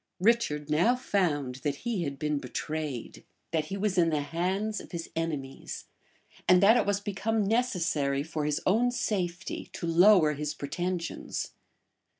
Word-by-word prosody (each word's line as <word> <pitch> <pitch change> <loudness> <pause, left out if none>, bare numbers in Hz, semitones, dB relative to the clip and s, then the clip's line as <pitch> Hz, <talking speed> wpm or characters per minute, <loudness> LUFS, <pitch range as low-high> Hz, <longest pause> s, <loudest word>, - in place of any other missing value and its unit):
Richard 185 -9 +2
now 170 +11 +3
found 150 - 0
that 145 0 -2
he 215 -8 0
had 140 -1 -4
been 150 0 -1
betrayed; 145 0 -4 0.3
that 160 -2 0
he 195 +6 -4
was 195 -2 +1
in 165 -1 +4
the 150 -2 +1
hands 185 +8 -1
of - - -14
his 170 -1 -5
enemies; 150 -5 -4 0.6
and 180 - +8
that 220 +4 +7
it 240 - +2
was 200 -1 +2
become 205 +2 -1
necessary, 175 - +1
for 155 -1 -3
his 150 0 0
own 230 +6 +3
safety, 190 -6 -2
to - - -5
lower 170 -1 +6
his 150 +1 -3
pretensions. 175 +4 -3
170 Hz, 155 wpm, -29 LUFS, 150-200 Hz, 0.6 s, and